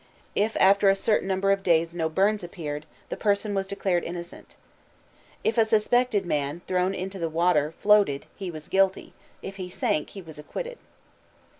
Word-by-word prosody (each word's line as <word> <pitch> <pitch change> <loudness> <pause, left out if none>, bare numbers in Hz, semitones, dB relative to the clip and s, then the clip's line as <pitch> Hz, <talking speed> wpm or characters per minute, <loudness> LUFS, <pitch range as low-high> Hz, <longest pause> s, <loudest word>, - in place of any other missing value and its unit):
If 215 +2 0
after 195 +1 +5
a 195 - +4
certain 195 0 +1
number 195 +1 +1
of 195 0 +1
days 165 -2 +2
no 165 -2 -1
burns 200 +5 +1
appeared 155 -3 -6 0.2
the - - -3
person 205 0 0
was 195 -1 -1
declared 190 -3 -1
innocent. 170 0 -8 0.9
If 230 - +1
a - - +7
suspected 220 -1 +2
man, 150 0 -2
thrown 185 +1 0
into 190 +1 -5
the 165 -1 -1
water, 160 -2 +1
floated 205 -9 +3
he 190 -2 -5
was 155 -3 -9
guilty; 195 0 +1 0.3
if 195 0 -7
he 185 -2 -6
sank, 155 -4 -1
he - - -6
was 160 -2 -11
acquitted. - - -6
190 Hz, 170 wpm, -26 LUFS, 165-200 Hz, 0.9 s, a